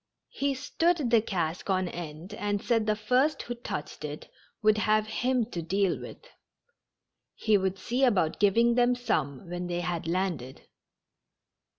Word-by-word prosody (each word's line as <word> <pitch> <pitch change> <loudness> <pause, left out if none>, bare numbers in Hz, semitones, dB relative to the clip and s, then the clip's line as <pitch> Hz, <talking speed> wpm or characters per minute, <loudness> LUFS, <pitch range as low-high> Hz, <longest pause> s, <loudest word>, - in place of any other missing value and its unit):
He 280 0 -1
stood 295 0 0
the 230 -2 +6
cask 175 -4 -3
on 185 -1 +1
end, 170 +2 -7
and 205 -1 -1
said 225 0 +1
the 215 - +3
first 250 +8 +1
who 240 - -4
touched 235 -11 -6
it 150 0 -7 0.3
would 215 0 +4
have 215 0 +3
him 245 +2 0
to 170 - -3
deal 190 +3 +1
with. - - -10 1.1
He 215 -1 +2
would 190 -1 +1
see 245 +7 -1
about 195 -11 +2
giving 230 +4 +4
them 245 +1 +3
some 155 - -2
when 175 +1 -4
they 175 0 -2
had 170 -2 -3
landed. 170 -8 -2
205 Hz, 155 wpm, -28 LUFS, 175-240 Hz, 1.1 s, the